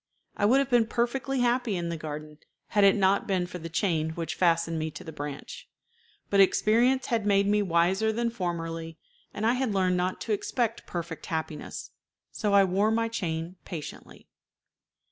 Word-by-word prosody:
I -, -, +1 dB
would 245 Hz, +6 st, +5 dB
have 275 Hz, -2 st, +1 dB
been 235 Hz, -2 st, +4 dB
perfectly 250 Hz, +3 st, -1 dB
happy 240 Hz, -3 st, +1 dB
in 170 Hz, -1 st, -3 dB
the 170 Hz, -, -2 dB
garden 150 Hz, -1 st, -7 dB, 0.3 s
had 205 Hz, -, +3 dB
it 195 Hz, -1 st, +6 dB
not 195 Hz, -1 st, +2 dB
been 185 Hz, -2 st, +1 dB
for 180 Hz, 0 st, -7 dB
the 165 Hz, 0 st, -7 dB
chain 160 Hz, -3 st, 0 dB
which 165 Hz, -1 st, -3 dB
fastened 165 Hz, -2 st, +1 dB
me 155 Hz, 0 st, -2 dB
to -, -, -10 dB
the 160 Hz, -, -8 dB
branch; 145 Hz, -1 st, -7 dB, 0.6 s
but 200 Hz, -, +3 dB
experience 235 Hz, +7 st, +4 dB
had 230 Hz, -2 st, 0 dB
made 200 Hz, -1 st, +3 dB
me 210 Hz, +1 st, +3 dB
wiser 190 Hz, +4 st, +2 dB
than 235 Hz, +1 st, -1 dB
formerly, 165 Hz, -5 st, -4 dB, 0.3 s
and 215 Hz, -, -3 dB
I 230 Hz, -, +4 dB
had 250 Hz, -5 st, -1 dB
learned 185 Hz, -1 st, +2 dB
not 180 Hz, +1 st, -1 dB
to 220 Hz, -, -1 dB
expect 230 Hz, +2 st, -2 dB
perfect 170 Hz, -2 st, -5 dB
happiness, 160 Hz, -3 st, -5 dB, 0.4 s
so 205 Hz, -2 st, 0 dB
I 200 Hz, -, +7 dB
wore 195 Hz, +3 st, +2 dB
my 230 Hz, +1 st, +1 dB
chain 170 Hz, -4 st, -3 dB
patiently. 160 Hz, -4 st, -9 dB
190 Hz, 180 wpm, -28 LUFS, 165-225 Hz, 0.6 s, I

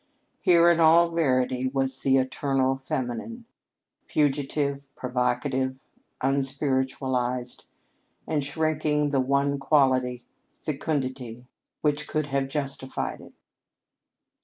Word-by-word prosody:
Here 170 Hz, -3 st, +5 dB
in 170 Hz, -, +2 dB
all 165 Hz, +1 st, +6 dB
verity 130 Hz, -5 st, +1 dB
was 135 Hz, 0 st, -1 dB
"the 135 Hz, 0 st, +3 dB
eternal 135 Hz, 0 st, +1 dB
feminine," 135 Hz, -, -4 dB, 0.6 s
fugitive, 140 Hz, -1 st, 0 dB
provocative, 130 Hz, +1 st, -1 dB, 0.4 s
unspiritualized, 130 Hz, -2 st, -1 dB, 0.6 s
and 150 Hz, -3 st, 0 dB
shrinking 150 Hz, 0 st, 0 dB
the 140 Hz, -, +2 dB
one 140 Hz, +1 st, +1 dB
quality, 130 Hz, -4 st, +2 dB, 0.3 s
fecundity, 130 Hz, -5 st, -3 dB, 0.4 s
which 150 Hz, 0 st, 0 dB
could 155 Hz, -1 st, -1 dB
have 135 Hz, -1 st, +1 dB
justified 135 Hz, -2 st, -3 dB
it. -, -, -14 dB
135 Hz, 90 wpm, -26 LUFS, 130-150 Hz, 0.6 s, all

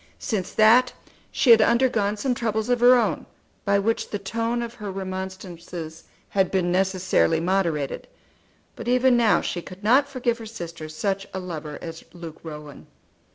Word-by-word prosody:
Since 200 Hz, -7 st, -3 dB
that 235 Hz, +4 st, +5 dB, 0.4 s
she 250 Hz, -, +4 dB
had 225 Hz, -1 st, +8 dB
undergone 225 Hz, -3 st, +2 dB
some 255 Hz, +4 st, 0 dB
troubles 220 Hz, -1 st, -2 dB
of 245 Hz, -1 st, +2 dB
her 245 Hz, +1 st, +7 dB
own 245 Hz, -, 0 dB, 0.4 s
by 200 Hz, 0 st, +3 dB
which 225 Hz, +3 st, -1 dB
the 205 Hz, -, -2 dB
tone 230 Hz, +4 st, -2 dB
of 235 Hz, 0 st, -6 dB
her 210 Hz, -4 st, -6 dB
remonstrances 185 Hz, -4 st, -7 dB, 0.2 s
had 190 Hz, -2 st, +1 dB
been 180 Hz, -2 st, 0 dB
necessarily 185 Hz, -3 st, +2 dB
moderated; 170 Hz, -5 st, -1 dB, 0.7 s
but -, -, -8 dB
even 250 Hz, +1 st, +4 dB
now 230 Hz, -3 st, +4 dB
she 175 Hz, -, -3 dB
could 185 Hz, +3 st, -12 dB
not 265 Hz, +6 st, +4 dB
forgive 245 Hz, -3 st, -1 dB
her 225 Hz, -, -8 dB
sister 170 Hz, -7 st, -8 dB
such 195 Hz, +5 st, -2 dB
a -, -, -2 dB
lover 160 Hz, -5 st, -6 dB
as 165 Hz, -1 st, -8 dB
Luke 170 Hz, -3 st, -9 dB
Rowan. 150 Hz, -3 st, -10 dB
195 Hz, 160 wpm, -24 LUFS, 175-230 Hz, 0.7 s, had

